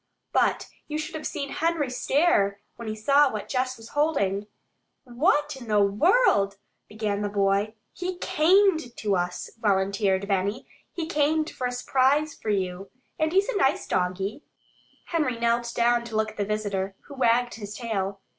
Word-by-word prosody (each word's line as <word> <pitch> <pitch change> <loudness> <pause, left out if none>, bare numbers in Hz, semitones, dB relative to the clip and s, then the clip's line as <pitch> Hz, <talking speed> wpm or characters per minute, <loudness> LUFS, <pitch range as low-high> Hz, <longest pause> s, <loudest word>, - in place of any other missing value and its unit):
But - - +2 0.2
you 300 - -3
should 310 +2 -5
have 315 -1 -4
seen 280 -1 -4
Henry 325 -5 0
stare 250 - +2 0.2
when 235 -1 -8
he 215 - -3
saw 280 +6 +4
what 215 -2 -5
Jess 255 0 -1
was 225 0 -12
holding! 210 -10 0 0.6
"Where 290 +5 +2 0.2
in 240 - -10
the 210 -1 +3
world 200 - +3 0.2
" - - -49
began 210 -1 -2
the 205 - -1
boy. 200 +2 +1 0.2
"He 360 0 -4
camed 320 -6 +3
to 205 -2 0
us," 180 0 -3
volunteered 195 -2 +1
Benny. 200 +5 -1 0.2
"He 335 - -4
camed 310 0 +1
for 250 - -3
a - - -3
s'prise 270 +4 +2
for 220 - -6
you. 190 -1 -2 0.3
And 315 0 +1
he's 390 +5 +2
a 480 - 0
nice 270 -7 +2
doggie." 190 +8 -2 0.6
Henry 300 -8 -1
knelt 235 0 +1
down 240 0 +3
to 230 -2 -7
look 215 0 +1
at - - -20
the 205 - 0
visitor, 200 -2 -2
who 285 - -13
wagged 245 -2 +2
his 210 -1 -7
tail. 200 -5 -3
235 Hz, 170 wpm, -26 LUFS, 200-295 Hz, 0.6 s, saw